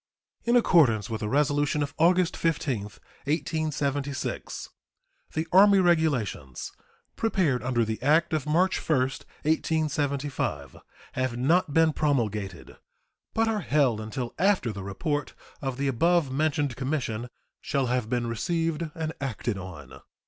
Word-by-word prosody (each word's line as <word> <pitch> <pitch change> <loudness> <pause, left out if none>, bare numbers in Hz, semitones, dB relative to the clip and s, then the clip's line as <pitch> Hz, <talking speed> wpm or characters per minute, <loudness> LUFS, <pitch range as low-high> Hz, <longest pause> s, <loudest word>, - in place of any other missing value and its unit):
In 235 +1 +3
accordance 130 - +4
with 110 - -2
the 105 - -2
resolution 145 +1 +2
of 145 - -5
August 175 +1 +3
15, 140 -10 -1 0.4
1876, 145 -2 -2 0.6
the 160 +1 -2
Army 200 +2 +7
regulations 150 - 0 0.4
prepared 175 - +1
under 120 -1 +1
the 110 0 -4
act 155 +5 +3
of 155 -2 -1
March 180 +5 +2
1, 155 - +1
1875, 140 - -1 0.3
have 130 -2 -2
not 155 +6 +2
been 160 -1 +4
promulgated, 110 - -1 0.6
but 225 0 +2
are 220 -1 0
held 135 -8 +2
until 120 +3 -5
after 190 - +2
the 100 - -6
report 140 +10 -3 0.3
of 135 -3 -3
the 140 0 0
above 160 +3 +2
mentioned 145 -2 0
commission 130 -4 -2 0.3
shall 135 -1 0
have 125 -2 -1
been 120 -1 0
received 165 +7 -1
and 160 -1 -3
acted 120 -4 -2
on. 90 -6 -10
145 Hz, 125 wpm, -27 LUFS, 120-160 Hz, 0.6 s, Army